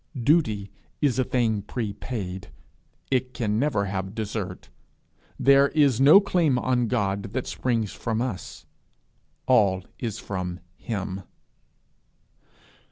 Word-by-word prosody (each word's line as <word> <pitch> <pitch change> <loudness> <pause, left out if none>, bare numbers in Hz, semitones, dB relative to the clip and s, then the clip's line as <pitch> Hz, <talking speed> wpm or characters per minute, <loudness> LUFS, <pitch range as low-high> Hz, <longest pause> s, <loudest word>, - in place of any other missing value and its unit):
Duty 115 -8 +2 0.3
is 135 -4 +1
a - - +4
thing 115 -5 0
prepaid: 105 -3 -5 0.6
it 130 -1 0
can 105 -2 0
never 120 -8 +1
have 95 +1 -4
desert. 105 -4 -5 0.7
There 140 0 +6
is 140 -6 +3
no 145 +8 +9
claim 175 -9 +2
on 125 -1 +1
God 100 -3 -1
that 130 0 -2
springs 115 -5 -1
from 115 -1 -2
us: 120 -7 -5 0.8
all 100 -7 +3 0.2
is 115 -4 -3
from 90 -4 -4 0.2
him. 95 -4 -4
115 Hz, 110 wpm, -25 LUFS, 100-130 Hz, 0.8 s, no